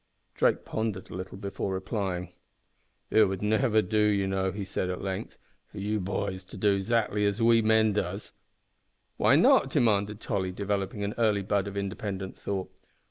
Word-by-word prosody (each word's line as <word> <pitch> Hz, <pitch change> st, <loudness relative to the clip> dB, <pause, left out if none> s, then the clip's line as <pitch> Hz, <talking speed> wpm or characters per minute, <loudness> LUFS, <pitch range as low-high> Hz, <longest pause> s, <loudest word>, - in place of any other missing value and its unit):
Drake -, -, +1 dB
pondered 110 Hz, -4 st, -3 dB
a -, -, -6 dB
little 95 Hz, 0 st, -6 dB
before 100 Hz, -1 st, -3 dB
replying. 95 Hz, -3 st, -3 dB, 0.8 s
"It 110 Hz, -1 st, +6 dB
would 95 Hz, 0 st, -3 dB
never 110 Hz, +1 st, +3 dB
do, 105 Hz, +4 st, 0 dB
you 105 Hz, -2 st, +3 dB
know," 95 Hz, 0 st, 0 dB
he 100 Hz, +1 st, -5 dB
said, 95 Hz, -1 st, -2 dB
at 90 Hz, 0 st, -4 dB
length, 95 Hz, -1 st, -4 dB, 0.3 s
"for -, -, -14 dB
you 105 Hz, +2 st, -1 dB
boys 95 Hz, 0 st, -3 dB
to 90 Hz, -, -11 dB
do 100 Hz, 0 st, +2 dB
'zackly 105 Hz, -1 st, +1 dB
as 100 Hz, +2 st, -1 dB
we 115 Hz, 0 st, +5 dB
men 110 Hz, -1 st, +3 dB
does." 100 Hz, 0 st, -3 dB, 0.9 s
"Why -, -, +5 dB
not?" -, -, +5 dB
demanded 105 Hz, -2 st, +1 dB
Tolly, 95 Hz, -4 st, -2 dB
developing 100 Hz, +1 st, -2 dB
an 100 Hz, +1 st, -2 dB
early 105 Hz, -3 st, +2 dB
bud 100 Hz, 0 st, 0 dB
of 100 Hz, 0 st, -6 dB
independent 100 Hz, -1 st, -4 dB
thought. 95 Hz, -2 st, -4 dB
100 Hz, 170 wpm, -28 LUFS, 95-105 Hz, 0.9 s, It